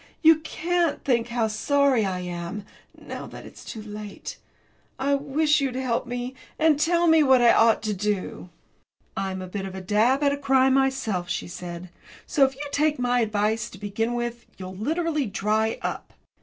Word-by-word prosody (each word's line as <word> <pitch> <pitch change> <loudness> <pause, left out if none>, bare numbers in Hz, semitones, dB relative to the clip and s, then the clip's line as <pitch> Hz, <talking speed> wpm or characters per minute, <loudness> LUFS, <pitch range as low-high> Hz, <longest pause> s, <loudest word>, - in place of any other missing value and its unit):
You 320 0 +7
can't 335 0 -1
think 240 -4 +1
how 235 -2 0
sorry 265 0 +2
I 185 -1 -3
am, 180 +3 -5 0.3
now - - -7
that - - -10
it's - - -12
too 220 - -8
late. 210 -1 -8 0.6
I 280 +1 +1
wish 295 +2 +2
you'd 265 -2 -1
help 255 -2 -1
me, 245 +1 -4 0.2
and 315 -2 +3
tell 340 +2 +3
me 320 -1 +6
what 265 -3 +5
I 240 -1 +6
ought 225 -1 +4
to 215 -1 -1
do." 200 -2 -3 0.7
"I'm 190 -1 -3
a - - -7
bit 195 +1 -4
of 190 - -8
a - - -5
dab 220 +9 +2
at 285 - +4
a 285 - -1
cry 265 -1 +3
myself," 260 -9 +1
she - - -3
said. 175 0 -7 0.4
"So, 285 - +2
if 270 0 +2
you 290 +2 -6
take 300 +1 +2
my 245 0 +1
advice, 215 0 0
to - - -12
begin 215 +4 -2
with, 240 0 -4
you'll 185 0 -7
literally 305 - -1
dry 215 +3 0
up." - - -4
240 Hz, 185 wpm, -25 LUFS, 210-280 Hz, 0.7 s, You